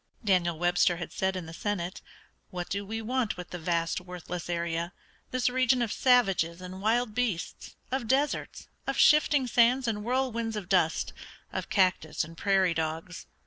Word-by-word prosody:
Daniel 180 -5 +2
Webster 175 +1 +3
had 175 - -6
said 190 0 0
in 185 -2 -4
the 160 - -9
Senate: 185 -1 -3 0.5
"What 180 -2 -5
do 200 +1 -2
we 225 +2 -5
want 245 -2 -1
with 180 -1 -8
the 175 - -5
vast, 165 +1 0
worthless 180 -1 -7
area, 170 0 -2 0.4
this 255 -1 0
region 255 0 +3
of 225 - -2
savages 195 -10 +3
and 185 +1 -8
wild 225 +1 +1
beasts, 220 -8 -3 0.2
of 260 -3 -1
deserts, 275 +5 0 0.2
of - - -1
shifting 300 -3 +5
sands 245 +1 +3
and 215 -2 0
whirlwinds 235 -2 -1
of 205 -4 -5
dust, 175 -4 +2 0.4
of - - -4
cactus 185 -5 +2
and 165 +2 -10
prairie 190 0 +2
dogs? 160 +2 -4
190 Hz, 165 wpm, -29 LUFS, 175-235 Hz, 0.5 s, shifting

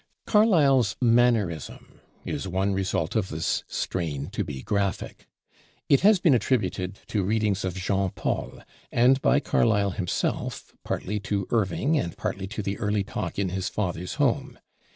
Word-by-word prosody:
Carlyle's 145 - +4
"mannerism" 115 - +1 0.2
is - - -3
one 95 +2 0
result 95 -4 -1
of 105 -4 0
this 80 +1 -1
strain 75 -6 -3
to - - -2
be 65 -3 -7
graphic. 100 -2 -2 0.6
It 140 - +6
has 210 +2 +5
been 170 -5 +4
attributed 100 -5 0
to 105 - 0
readings 105 0 0
of 95 -2 -2
Jean 95 +1 0
Paul, - - -4 0.3
and 130 +3 +4
by 145 - +4
Carlyle 105 -7 +2
himself, 90 -2 -3
partly 105 +3 -3
to 100 -1 -2
Irving 120 - +1
and 85 - -4
partly 100 -2 -3
to 105 +1 -5
the 100 +2 -3
early 105 -2 0
talk 95 -3 -5
in 100 -2 0
his 95 0 -2
father's 90 -3 -3
home. - - 0
100 Hz, 150 wpm, -26 LUFS, 95-115 Hz, 0.6 s, It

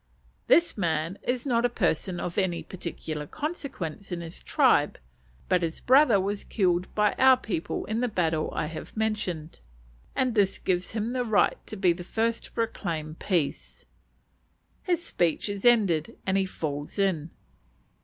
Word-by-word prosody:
This 340 - +4
man 165 +1 -1
is 250 +1 -2
not 240 -3 +2
a 245 - +3
person 180 -4 0
of 175 - -2
any 180 -3 0
particular 160 -4 -6
consequence 265 - -5
in 175 -1 -3
his 165 0 -8
tribe, - - +3 0.5
but 180 -1 +3
his 165 -1 -2
brother 255 -5 +5
was 200 +2 -2
killed 180 -3 +1
by 210 -1 +3
our 260 -1 +7
people 200 -9 -3
in 220 +2 -2
the 250 - +1
battle 165 -7 0
I - - -2
have 160 +7 -8
mentioned, 190 -8 -2 0.6
and 255 -2 +1
this 200 -3 +2
gives 180 +1 -1
him 225 +2 -2
the 250 -1 0
right 220 -4 +2
to - - -6
be 190 -4 +3
the 175 +1 -8
first 230 +5 -1
to - - -14
proclaim 170 -9 -3
peace. 165 -3 -2 1.0
His 350 -2 0
speech 170 +1 0
is 200 0 -4
ended 195 -10 +3
and 190 - +1
he 195 -1 +2
"falls 145 -3 -5
in." 180 -6 +1
190 Hz, 160 wpm, -27 LUFS, 170-230 Hz, 1.0 s, our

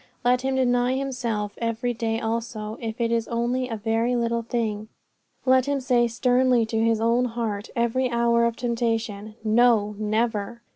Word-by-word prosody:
Let 250 +1 +3
him 265 0 -1
deny 245 -1 +2
himself 240 -6 -2
every 230 +1 -1
day 225 -1 -2
also, 225 -1 -3
if 225 0 -5
it 230 -1 0
is 230 -1 0
only 240 +2 -1
in 235 - -5
a - - -3
very 225 +3 0
little 235 -1 0
thing. 220 -2 -2 0.6
Let 260 0 +4
him 285 -1 0
say 245 -2 +2
sternly 245 0 +2
to 225 0 -2
his 225 -1 +2
own 235 +2 +2
heart 225 -3 -3
every 240 +2 +1
hour 235 -1 +2
of 235 -1 0
temptation, 225 -3 -2
No! 220 -2 +3
never! 220 +1 -1
235 Hz, 165 wpm, -24 LUFS, 225-245 Hz, 0.6 s, Let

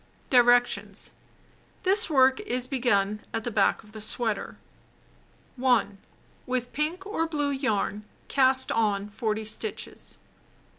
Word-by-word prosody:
Directions: 245 -1 +2 0.7
This 390 +2 +4
work 265 -3 +4
is 255 -12 -2
begun 210 -6 +1 0.2
at 225 - -2
the 240 - -3
back 205 0 +2
of 210 - -18
the 215 0 -9
sweater. 220 -1 -2 1.0
1. 240 -6 +1 0.5
With 250 -1 -3
pink 325 +6 -2
or 360 -5 -1
blue 295 -3 -1
yarn 215 -6 -2 0.2
cast 260 -1 +3
on 205 -2 0
40 220 -1 -2
stitches. 315 - -6
245 Hz, 115 wpm, -26 LUFS, 215-275 Hz, 1.0 s, This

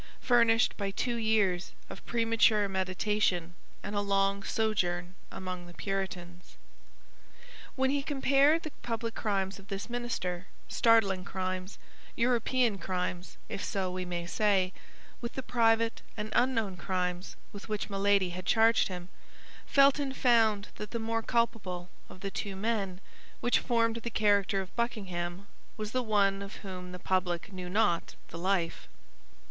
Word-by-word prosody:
furnished 235 -1 +4
by 200 -2 -1
two 240 +5 -1
years 215 -6 +1
of - - -10
premature 225 -3 +3
meditation 185 -2 0 0.3
and 205 - -4
a 205 - +2
long 195 0 +1
sojourn 185 -5 0 0.2
among 180 -1 -6
the 175 - -13
Puritans. 180 -3 -5 1.2
When 265 0 +2
he 285 0 +1
compared 280 +3 +3
the 310 - -5
public 230 -1 -3
crimes 195 -3 -1
of 195 - -15
this 200 +4 -5
minister—startling 200 -2 +1
crimes, 185 0 -4 0.4
European 240 -2 +2
crimes, 180 -1 -3
if - - -5
so 190 -2 -1
we 185 0 -3
may 175 -1 -4
say—with 200 +4 -2
the 265 - -4
private 230 -2 +2 0.2
and 215 0 -4
unknown 225 -7 +1
crimes 180 0 -2 0.2
with 205 +2 -9
which 210 -1 -2
Milady 200 -2 +2
had 185 +1 -6
charged 225 +1 +5
him, 180 -2 -6 0.6
Felton 275 0 +4
found 225 -6 +3
that 210 - -6
the 235 - -3
more 225 0 -1
culpable 200 -7 -1 0.2
of 185 - -13
the 195 - -3
two 200 0 -4
men 195 -3 -1 0.4
which 245 - +3
formed 230 -2 +1
the 235 +1 -4
character 205 -3 +2
of 185 - -10
Buckingham 195 -6 -3 0.3
was 215 -1 -4
the 255 - +1
one 200 -3 +2
of 200 0 -7
whom 180 -1 -7
the 180 - -6
public 180 0 -1
knew 180 -1 -6
not 180 -4 +1
the 165 - -7
life. 180 -2 0
200 Hz, 140 wpm, -30 LUFS, 185-230 Hz, 1.2 s, charged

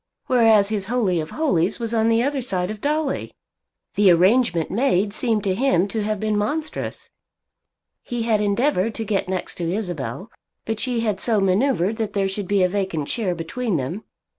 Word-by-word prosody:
Whereas 225 -5 +4
his 205 -3 -2
Holy 215 -7 +1
of 155 0 -4
Holies 210 - 0
was 230 -1 -3
on 225 0 +2
the 230 +1 +3
other 280 0 -1
side 190 -5 -1
of 215 -1 -8
Dolly! 300 -1 -1 0.6
The 205 -2 +4
arrangement 180 0 +3
made 205 -3 +1
seemed 225 -3 0
to 190 - +1
him 195 -5 +2
to 220 +2 -2
have 215 0 -2
been 215 0 0
monstrous. 295 +10 -3 0.9
He 240 -1 -4
had 220 -2 +2
endeavoured 210 0 +1
to 225 - -3
get 195 -3 -1
next 185 -1 -3
to 170 -1 -1
Isabel; 180 -1 -4 0.3
but 225 -1 -3
she 245 -1 -1
had 210 -4 -1
so 220 -1 +2
manoeuvred 200 +1 +1
that 220 -3 -3
there 200 -2 +1
should 195 0 -4
be 200 -1 +2
a - - +4
vacant 185 -6 -2
chair 195 -7 -1
between 180 +5 -2
them. 150 +11 -4
210 Hz, 185 wpm, -22 LUFS, 185-230 Hz, 0.9 s, Whereas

